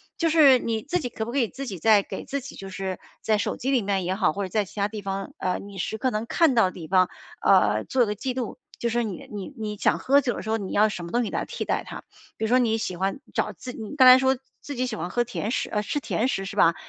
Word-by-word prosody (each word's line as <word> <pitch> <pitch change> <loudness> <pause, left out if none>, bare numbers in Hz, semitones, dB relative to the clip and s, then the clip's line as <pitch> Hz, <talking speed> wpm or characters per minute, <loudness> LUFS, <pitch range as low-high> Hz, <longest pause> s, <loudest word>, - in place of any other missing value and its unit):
就 330 - +1
是 300 -5 +7
你 225 -2 -2
自 350 +6 -1
己 250 - -4
可 220 -1 -4
不 235 - -5
可 280 - 0
以 235 -4 +1
自 275 - -7
己 195 -8 -6
再 215 +2 +5
给 - - -6
自 280 - -3
己 280 +2 -10
就 195 - -8
是 190 0 -4 0.2
在 215 -1 +2
手 - - -2
机 265 - -1
里 255 -4 +3
面 195 -2 -1
也 185 - 0
好， 190 -5 +2
或 200 +4 -3
者 185 - -7
在 210 +3 +1
其 200 +2 -10
它 200 - +2
地 210 0 -7
方， 195 0 -4
呃， 185 -1 0
你 200 0 -10
时 205 +4 -3
刻 255 +4 0
能 215 0 -2
看 325 0 +3
到 225 - +5
的 185 - -1
地 165 -4 -9
方， 185 0 +4 0.3
呃， - - +4
做 255 -2 +2
个 210 - -2
记 255 +5 -3
录， 245 -2 -4 0.2
就 235 - 0
是 240 +1 +1
你 205 -6 -6
你 205 +4 -6
你 215 -1 -4
想 - - +2
喝 280 +2 +4
酒 245 -3 -1
的 - - -5
时 220 - -6
候， 225 - +2
你 195 -3 -5
要 215 +1 +4
什 185 -4 -5
么 170 - -7
东 240 +1 +2
西 220 - -3
来 - - -1
替 - - -5
代 - - 0
它。 - - -8 0.3
比 220 - -1
如 - - 0
说 245 +3 +4
你 225 -3 +2
喜 195 -4 -3
欢 195 +6 -1
找 - - 0
自 250 - -8
你 225 +5 -7
刚 260 -3 +8
才 255 0 +11
说 265 0 +2 0.2
自 285 - -6
己 255 +1 0
喜 245 -3 -3
欢 175 -3 -4
喝 240 +5 +1
甜 225 -2 -4
食 - - -1
呃， 210 - 0
吃 290 +7 -2
甜 250 -3 -1
食 195 -8 -2
是 195 - -6
吧？ 165 0 +5
220 Hz, 325 characters per minute, -25 LUFS, 195-255 Hz, 0.3 s, 才